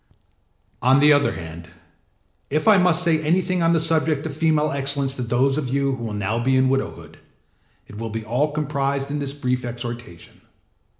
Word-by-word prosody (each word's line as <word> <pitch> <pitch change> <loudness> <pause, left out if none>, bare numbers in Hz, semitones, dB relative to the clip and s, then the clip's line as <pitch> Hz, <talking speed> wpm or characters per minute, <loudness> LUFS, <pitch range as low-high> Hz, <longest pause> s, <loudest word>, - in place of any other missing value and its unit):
On 130 +2 +4
the 150 +1 +6
other 145 0 +2
hand, 85 0 -9 0.8
if 155 +5 -1
I 210 -3 +7
must 180 -1 +3
say 160 -3 +2
anything 180 +3 +1
on 165 0 +3
the 165 - +3
subject 155 -2 0
of 150 -3 -5
female 155 -1 +1
excellence 140 0 -1
to - - -3
those 130 +4 +1
of 135 -4 -4
you 140 +1 0
who 120 - -8
will 110 - -4
now 105 +3 -2
be 130 +1 +2
in 130 0 +3
widowhood, 135 0 -3 0.7
it 105 - -11
will 115 0 -4
be 110 0 -5
all 130 +7 0
comprised 140 -2 -2
in 145 - -2
this 140 -1 -4
brief 125 -3 -2
exhortation. 120 -7 -8
140 Hz, 185 wpm, -22 LUFS, 120-155 Hz, 0.8 s, I